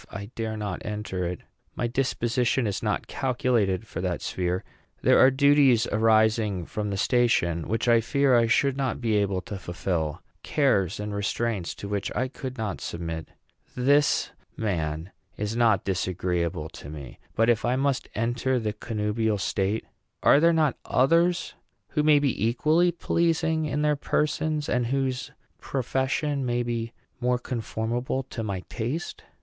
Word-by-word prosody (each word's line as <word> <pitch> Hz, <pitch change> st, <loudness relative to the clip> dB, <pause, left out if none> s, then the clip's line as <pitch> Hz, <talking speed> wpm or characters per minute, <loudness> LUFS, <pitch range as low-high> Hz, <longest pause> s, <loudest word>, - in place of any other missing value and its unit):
I 100 Hz, +3 st, -7 dB
dare 110 Hz, -1 st, -3 dB
not 105 Hz, -4 st, -4 dB
enter 105 Hz, -4 st, -3 dB
it. 90 Hz, 0 st, -5 dB, 0.3 s
My -, -, -1 dB
disposition 120 Hz, 0 st, 0 dB
is 100 Hz, -2 st, -2 dB
not -, -, -1 dB
calculated 120 Hz, -6 st, 0 dB
for 90 Hz, -, -6 dB
that 90 Hz, -2 st, -2 dB
sphere. 90 Hz, 0 st, -1 dB, 0.4 s
There -, -, +5 dB
are 130 Hz, -, +8 dB
duties 135 Hz, -3 st, +4 dB
arising 110 Hz, -3 st, +3 dB
from 105 Hz, +2 st, -3 dB
the 100 Hz, -, -2 dB
station 95 Hz, -8 st, +2 dB
which 115 Hz, +3 st, -1 dB
I 115 Hz, -1 st, +5 dB
fear 140 Hz, +2 st, +3 dB
I 115 Hz, -1 st, +4 dB
should 135 Hz, +3 st, +2 dB
not 135 Hz, -3 st, -1 dB
be 115 Hz, -3 st, 0 dB
able 100 Hz, -2 st, 0 dB
to 100 Hz, 0 st, -7 dB
fulfil, 85 Hz, -3 st, -2 dB, 0.2 s
cares 105 Hz, -, +1 dB
and 105 Hz, 0 st, -4 dB
restraints 100 Hz, -1 st, -2 dB
to 100 Hz, -, -7 dB
which 100 Hz, -1 st, -2 dB
I 130 Hz, +1 st, 0 dB
could 130 Hz, -1 st, -7 dB
not 110 Hz, -4 st, -3 dB
submit. 80 Hz, -1 st, -5 dB, 0.5 s
This 140 Hz, +4 st, +3 dB, 0.3 s
man 80 Hz, -4 st, -2 dB, 0.3 s
is 105 Hz, +2 st, -2 dB
not 115 Hz, -5 st, +3 dB
disagreeable 90 Hz, -3 st, -1 dB
to 70 Hz, -, -10 dB
me; 75 Hz, -4 st, -9 dB, 0.2 s
but 115 Hz, -, +3 dB
if 120 Hz, -2 st, +3 dB
I 120 Hz, +1 st, +1 dB
must 135 Hz, 0 st, 0 dB
enter 120 Hz, +3 st, 0 dB
the 110 Hz, -3 st, -2 dB
connubial 105 Hz, 0 st, -1 dB
state, 100 Hz, +2 st, -1 dB, 0.4 s
are 140 Hz, -, +6 dB
there 165 Hz, +2 st, +5 dB
not 155 Hz, -4 st, +2 dB
others 170 Hz, +6 st, +2 dB, 0.4 s
who 150 Hz, -, 0 dB
may 150 Hz, 0 st, +5 dB
be 140 Hz, -7 st, 0 dB
equally 155 Hz, +9 st, +3 dB
pleasing 160 Hz, -1 st, +1 dB
in 150 Hz, 0 st, -1 dB
their 150 Hz, 0 st, +3 dB
persons, 150 Hz, +1 st, -1 dB
and 120 Hz, -1 st, +1 dB
whose 130 Hz, 0 st, -1 dB, 0.3 s
profession 135 Hz, +2 st, -1 dB
may 120 Hz, -1 st, 0 dB
be 115 Hz, -1 st, -3 dB, 0.3 s
more 125 Hz, 0 st, +1 dB
conformable 120 Hz, +1 st, -3 dB
to 115 Hz, -, -4 dB
my 100 Hz, -4 st, -3 dB
taste? 125 Hz, -, -5 dB
115 Hz, 155 wpm, -26 LUFS, 100-135 Hz, 0.5 s, are